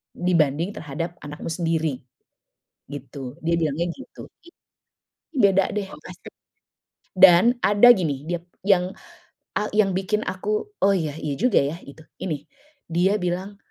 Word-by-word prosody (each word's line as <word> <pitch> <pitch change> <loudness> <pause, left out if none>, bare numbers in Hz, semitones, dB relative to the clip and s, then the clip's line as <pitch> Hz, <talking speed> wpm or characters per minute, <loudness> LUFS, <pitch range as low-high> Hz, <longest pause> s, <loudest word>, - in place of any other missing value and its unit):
dibanding 170 0 +1
terhadap 165 +1 -6
anakmu 150 +3 -7
sendiri," 160 -5 -1 0.9
gitu. 140 0 -8
Dia 170 +1 +1
bilangnya 160 +2 0
gitu. 265 - -12 1.1
Beda 195 -6 +4
deh 205 -1 -2 0.2
pasti. - - -12 0.9
Dan 190 +6 +7
ada 205 +5 +6
gini, 145 -8 -2
dia 175 -1 -2 0.2
yang, 190 -2 +2 0.6
eee 210 - -1
yang 200 -2 +4
bikin 195 +3 -1
aku, 210 - -2
"Oh 200 0 +5
iya, 155 -5 -2
iya 150 -3 -3
juga 250 +3 +3
ya," 145 +4 -3
itu, 150 +3 -14 0.2
ini, 150 -6 -4 0.5
dia 180 +5 +2
bilang, 185 +3 -3
175 Hz, 125 wpm, -23 LUFS, 155-195 Hz, 1.1 s, Dan